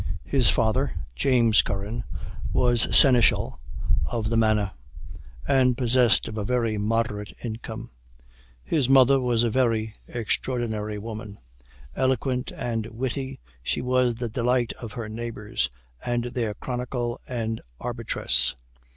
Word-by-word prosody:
His 130 -4 +3
father, 110 -1 +1 0.2
James 115 - +4
Curran, 105 +4 -3 0.5
was 120 -2 +3
seneschal 125 -4 +5 0.5
of 115 -2 -2
the - - +2
manor, 110 -3 +2 0.8
and 130 -2 +3
possessed 125 -2 +3
of 110 0 -5
a - - -2
very 115 0 0
moderate 105 -1 -1
income. 115 0 -6 0.7
His 140 -6 +1
mother 135 0 +6
was 120 -2 +2
a 115 - +1
very 115 -3 +1
extraordinary 110 -2 -2
woman. 105 -1 -7 0.6
Eloquent 130 -1 0
and 115 -2 -2
witty, 130 +3 -4 0.2
she - - -2
was 125 -1 +2
the 120 +1 -3
delight 120 +1 +1
of 115 -3 -7
her 115 -1 -5
neighbors, 110 0 -3 0.3
and 120 -1 0
their 120 -3 -2
chronicle 125 -1 -3
and 115 -3 -3 0.2
arbitress. 120 -2 0
120 Hz, 120 wpm, -25 LUFS, 110-125 Hz, 0.8 s, mother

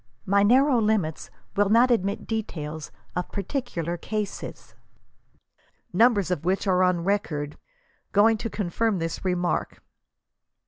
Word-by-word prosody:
My 200 +1 +3
narrow 255 +4 +4
limits 210 -8 0 0.3
will 205 -1 +3
not 235 +4 +5
admit 200 -2 0
details 160 -9 -4 0.2
of 180 - -3
particular 175 - -3
cases, 210 +3 -5 1.2
numbers 215 -6 +4
of 170 -5 -1
which 185 +4 0
arc 185 -1 +3
on 180 -2 +2
record, 155 -7 -1 0.6
going 220 +2 +5
to 230 - -3
confirm 210 +2 -1
this 165 -1 -4
remark. 180 -1 -1
200 Hz, 120 wpm, -25 LUFS, 175-220 Hz, 1.2 s, not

